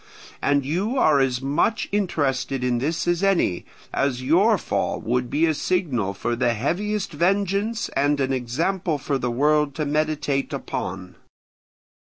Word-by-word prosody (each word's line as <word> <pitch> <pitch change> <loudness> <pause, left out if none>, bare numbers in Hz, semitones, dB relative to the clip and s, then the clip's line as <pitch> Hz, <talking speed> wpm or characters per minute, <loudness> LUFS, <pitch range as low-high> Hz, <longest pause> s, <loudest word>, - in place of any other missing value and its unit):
And 140 -1 +2
you 195 - -1
are 155 - +4
as 130 -1 0
much 145 +11 +1
interested 140 -9 -1
in 125 -1 +1
this 160 +6 -1
as 175 0 +1
any, 195 - +1 0.3
as 130 -2 0
your 190 - +4
fall - - -2
would 125 +1 -1
be 155 +3 +2
a 160 - +2
signal 140 - -1
for 120 +4 -2
the 120 -1 +1
heaviest 200 - -1
vengeance 200 +7 0
and 145 +1 +1
an 135 0 0
example 155 +7 -1
for 140 0 -2
the 125 - -1
world 150 +3 +2
to 155 - -1
meditate 150 -2 -1
upon. 90 0 -5
145 Hz, 150 wpm, -23 LUFS, 130-180 Hz, 0.3 s, are